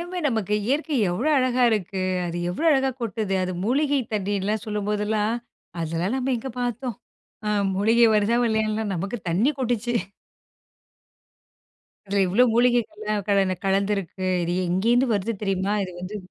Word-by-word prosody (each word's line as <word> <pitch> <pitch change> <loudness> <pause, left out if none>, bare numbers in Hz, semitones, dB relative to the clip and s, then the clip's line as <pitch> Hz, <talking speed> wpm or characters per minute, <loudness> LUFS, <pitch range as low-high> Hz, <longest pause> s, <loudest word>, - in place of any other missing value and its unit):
எல்லாமே 360 +1 -5
நமக்கு 220 -6 0
இயற்கை 295 +4 0 0.2
எவ்வளோ 225 - -1
அழகா 255 -1 +2
இருக்கு. 195 -3 -1 0.2
அது 170 0 -4
எவ்வளோ 250 - -2
அழகா 270 -2 +3
கொட்டுது. 220 -3 -2
அது 185 0 -2
மூலிகை 280 +4 +2
தண்ணீர்ல்லாம் 205 +1 -1
சொல்லும் 210 -1 -3
போதெல்லாம், 210 +1 0 0.5
அதெல்லாம் 165 +6 -1
நம்ம 265 0 0
எங்க 265 +3 -5
பார்த்தோம். 245 -1 -3 0.5
அ - - +1 0.3
மூலிகை 225 +4 +4
வருதா 210 +2 +3
வல்லையான்னுலாம் 220 -2 0
நமக்கு 195 +6 -3
தண்ணி 195 - +2
கொட்டுச்சு 240 -2 -1 2.1
இதில 200 0 +1
இவ்வளோ 200 +8 +4
மூலிகைகள்லாம் 215 -4 +1
கல 195 -2 +2
கலந்திருக்கு. 195 -1 0 0.2
இது 170 - -2 0.2
எங்கேருந்து 230 +9 +2
வருது 205 +3 -1
தெரியுமா? 195 0 0
இது 185 - -8
வந்து 185 +4 -5
215 Hz, 135 wpm, -24 LUFS, 195-240 Hz, 2.1 s, மூலிகை